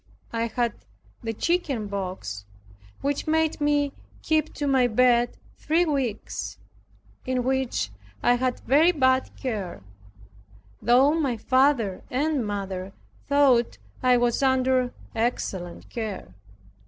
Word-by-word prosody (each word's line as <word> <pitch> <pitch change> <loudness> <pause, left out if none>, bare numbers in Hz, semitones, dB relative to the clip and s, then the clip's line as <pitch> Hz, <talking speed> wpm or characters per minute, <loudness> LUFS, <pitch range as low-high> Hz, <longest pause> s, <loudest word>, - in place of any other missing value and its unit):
I 230 0 0
had 235 0 -1 0.5
the 225 -2 -2
chickenpox, 200 - -2 0.6
which 285 +2 -1
made 320 -1 +1
me 290 -1 +2 0.3
keep 315 -1 +1
to 290 - -2
my 265 -3 +4
bed 240 +1 +3 0.2
three 330 +3 +2
weeks, 265 -9 -3 0.7
in 255 -1 -1
which 255 - -1 0.3
I 245 - +5
had 250 0 -1
very 305 +7 +5
bad 260 -5 +2
care, 205 - -4 1.0
though 250 +6 +5
my 280 -7 0
father 255 -5 +2
and 285 0 0
mother 195 -2 -4 0.3
thought 275 -5 +3 0.2
I 250 -1 +5
was 240 +1 +1
under 260 -1 +2 0.2
excellent 195 -6 -3
care. 210 - -5
250 Hz, 110 wpm, -25 LUFS, 225-280 Hz, 1.0 s, I